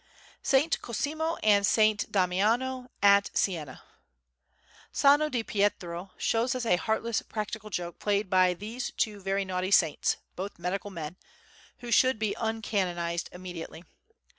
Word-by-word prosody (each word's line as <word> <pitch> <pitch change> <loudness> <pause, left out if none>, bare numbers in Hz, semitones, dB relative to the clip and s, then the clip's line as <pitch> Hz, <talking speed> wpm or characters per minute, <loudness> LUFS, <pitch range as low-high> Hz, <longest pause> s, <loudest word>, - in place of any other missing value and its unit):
Saint 280 +5 +2
Cosimo 315 +7 -2
and 205 -2 +5
Saint 215 +1 +3
Damiano 225 +8 +1
at 200 0 +6
Siena 155 -8 -2 1.1
Sano 290 +2 +4
di 245 -5 -1
Pietro 195 -4 -1
shows 240 +3 +1
us 250 -2 -3
a 200 - +4
heartless 220 +4 -1
practical 215 0 -5
joke 175 -3 -4
played 205 0 0
by 185 -1 +3
these 220 +7 -5
two 210 -2 -2
very 195 +1 -1
naughty 185 0 -2
saints, 165 -6 +3 0.2
both 195 +3 -6
medical 180 +4 -3
men, 165 -2 -7 0.6
who 240 -1 -6
should 255 +1 +4
be 215 -1 -1
uncanonised 185 -7 -1
immediately. 175 -2 -8
205 Hz, 130 wpm, -28 LUFS, 180-230 Hz, 1.1 s, at